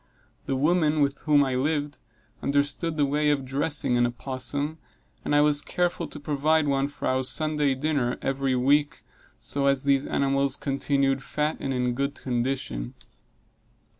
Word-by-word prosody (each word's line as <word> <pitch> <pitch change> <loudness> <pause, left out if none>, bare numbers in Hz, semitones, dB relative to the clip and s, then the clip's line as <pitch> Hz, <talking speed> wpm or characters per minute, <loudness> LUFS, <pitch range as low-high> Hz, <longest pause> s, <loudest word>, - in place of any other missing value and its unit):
The 135 - 0
woman 155 +1 +2
with 140 -1 +1
whom 145 -2 +4
I 135 -2 -1
lived, 145 +2 -1 0.4
understood 145 +3 0
the 145 - +3
way 150 +2 +1
of 140 -2 0
dressing 135 -1 0
an 120 0 +3
opossum, 140 +5 -4 0.4
and 145 - 0
I 145 - +6
was 150 -1 +4
careful 175 -2 -1
to 150 - -9
provide 150 +2 +1
one 140 0 +1
for 145 - -5
our 130 0 +1
Sunday 150 0 0
dinner 135 -3 -1
every 135 -1 -1
week, 145 +4 +2 0.4
so 140 - -2
long 140 - +4
as 135 0 +1
these 140 0 +2
animals 140 0 +1
continued 135 -1 0
fat 150 +3 -2
and 135 - -3
in 125 -1 0
good 140 +3 -2
condition. 120 - -3
140 Hz, 160 wpm, -26 LUFS, 135-150 Hz, 0.4 s, I